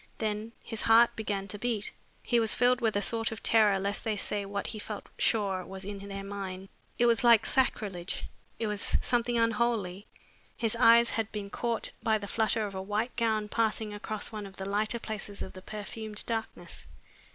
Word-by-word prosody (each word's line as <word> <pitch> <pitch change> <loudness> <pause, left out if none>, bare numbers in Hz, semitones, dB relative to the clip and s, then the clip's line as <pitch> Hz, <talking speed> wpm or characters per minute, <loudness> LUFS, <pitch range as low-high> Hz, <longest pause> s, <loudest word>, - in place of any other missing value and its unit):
Then 215 +1 -2
his 225 -2 -4
heart 230 +1 +6
began 200 -3 -2
to 205 - -5
beat. 230 -2 -1 0.3
He 240 - +3
was 225 -2 +4
filled 250 +1 +4
with 225 -3 +1
a 205 - +1
sort 225 +2 +1
of 220 - -7
terror 215 -3 +5
lest 200 +2 -2
they 220 -1 0
should 205 - -2
say 205 -1 -2
what 200 0 -3
he 215 - -4
felt 210 0 -7
sure 195 -4 +2
was 190 +1 -8
in 200 0 -5
their 195 0 -6
minds. 195 -1 -6 0.3
It 240 - +4
was 235 0 +4
like 235 -2 +7
sacrilege. 200 -9 0 0.3
It 225 - -2
was 210 -2 +1
something 240 0 +1
unholy. 225 -4 +1 0.5
His 225 -1 0
eyes 235 0 +6
had 220 0 -1
been 200 -2 -5
caught 235 -1 -1
by 220 -1 +2
the 205 -1 -7
flutter 220 +1 +1
of 200 - -6
a 190 - -4
white 210 +5 -2
gown 220 -3 +1
passing 220 -1 0
across 210 +1 -4
one 210 -2 -5
of 195 - -9
the 190 - -5
lighter 210 +4 0
places 210 -3 -5
of - - -8
the 185 - -10
perfumed 210 +1 -4
darkness. 225 -1 -4
215 Hz, 195 wpm, -30 LUFS, 200-230 Hz, 0.5 s, like